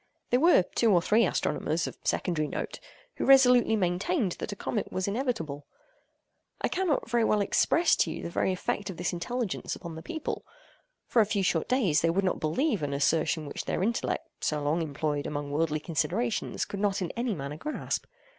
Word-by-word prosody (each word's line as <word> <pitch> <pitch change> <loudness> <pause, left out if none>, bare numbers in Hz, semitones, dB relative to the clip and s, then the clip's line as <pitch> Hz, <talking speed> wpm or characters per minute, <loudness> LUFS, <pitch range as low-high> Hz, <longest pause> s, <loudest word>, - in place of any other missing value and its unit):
There 245 - +4
were 330 - +6
two 225 +4 +1
or 180 - +6
three 210 +4 +3
astronomers, 165 -1 -1
of - - -6
secondary 155 -4 0
note, - - -5 0.4
who - - -2
resolutely 250 -4 +6
maintained 195 - 0
that - - -4
a - - -4
contact 210 +1 -3
was 185 +1 -2
inevitable. 200 - -2 0.9
I - - 0
cannot 355 -6 0
very 235 0 +2
well 215 -1 +3
express 325 - +3
to - - +2
you - - -5
the 170 - 0
effect 195 +2 -2
of 185 - -6
this 175 +1 -2
intelligence 225 +5 -3
upon 170 -2 -8
the 160 - -7
people. 315 - -4 0.6
For 235 - +3
a 210 - +2
few 205 -2 0
short 165 -3 +1
days 230 - +3
they 165 - +2
would 190 +4 +1
not 185 - 0
believe 210 - 0
an 140 -1 -2
assertion 155 +2 +1
which 145 - -5
their - - -1
intellect 230 +3 -2
so 150 -1 0
long 155 +4 +1
employed 145 -1 -2
among 145 -1 -4
worldly 155 +1 0
considerations 190 +9 -1
could 200 - -6
not 200 -2 +1
in 175 - -3
any 235 -2 -2
manner 140 0 -5
grasp. 300 - -3
185 Hz, 190 wpm, -28 LUFS, 160-235 Hz, 0.9 s, were